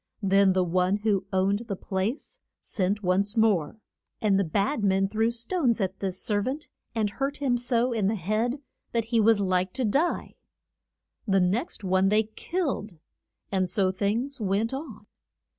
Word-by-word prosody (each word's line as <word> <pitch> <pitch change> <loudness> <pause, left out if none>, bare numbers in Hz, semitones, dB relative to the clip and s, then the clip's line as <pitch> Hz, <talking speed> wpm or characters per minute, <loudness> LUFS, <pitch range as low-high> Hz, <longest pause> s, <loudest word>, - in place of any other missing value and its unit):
Then 195 0 +4
the 185 0 +2
one 180 +2 +1
who 205 -2 0
owned 200 +4 +1
the 200 - -2
place 210 - -3 0.2
sent 200 +1 -1
once 200 +4 +1
more, 215 -5 +2 0.4
and 200 -3 +2
the - - +3
bad 200 - 0
men 195 0 +3
threw 220 +3 +1
stones 235 +1 0
at 190 -1 -2
this 190 -2 -2
ser 205 -2 0
vant, 270 +7 -3 0.3
and 220 -2 +1
hurt 275 +7 -3
him 270 -4 +1
so 245 0 +1
in 215 -4 +1
the 220 - +1
head 220 - -1 0.3
that 230 -2 +1
he 230 - +5
was 220 0 +4
like 185 -1 0
to 260 - 0
die. 285 +11 0 0.9
The 195 -1 +3
next 205 - -1
one 190 +1 +3
they 215 +2 +4
killed, 220 - -3 0.5
and 185 -2 +1
so 190 -1 +1
things 225 +8 -2
went 210 +4 0
on. 265 -7 -7
210 Hz, 165 wpm, -27 LUFS, 190-235 Hz, 0.9 s, he